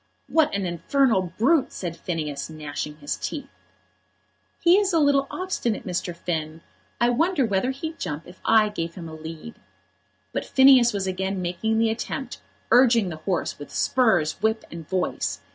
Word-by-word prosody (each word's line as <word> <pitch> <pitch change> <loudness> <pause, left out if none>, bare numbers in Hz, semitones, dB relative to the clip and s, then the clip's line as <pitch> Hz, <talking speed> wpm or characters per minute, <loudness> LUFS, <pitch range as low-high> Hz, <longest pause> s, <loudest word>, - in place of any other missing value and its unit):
"What 315 -2 +3
an 200 -1 -1
infernal 185 - +1
brute!" 270 +5 +3
said 170 -3 -5
Phineas, 155 -6 -4
gnashing 150 -1 -6
his 145 -1 -4
teeth. 295 - -5 1.1
"He 350 +2 +5
is 400 -2 0
a 330 - +4
little 280 -2 +3
obstinate, 365 - -2
Mr. 180 -1 -3
Finn; 160 -2 -4 0.4
I 240 - +4
wonder 320 +2 +2
whether 200 +3 0
he'd 315 +5 -5
jump 150 -2 -4
if 180 +1 -15
I 220 -1 +4
gave 165 -5 -4
him 170 -3 -7
a 160 - -9
lead." 160 +7 -9 0.7
But - - -1
Phineas 265 -3 +6
was 200 -3 -2
again 190 +1 -2
making 185 +5 -1
the 225 0 +3
attempt, 240 +3 -5 0.3
urging 235 -4 +5
the 160 - -6
horse 170 0 -2
with 145 - -9
spurs, 195 -11 +1
whip, 220 +1 +1
and 165 -2 -9
voice. 185 -1 -1
195 Hz, 160 wpm, -24 LUFS, 170-255 Hz, 1.1 s, Phineas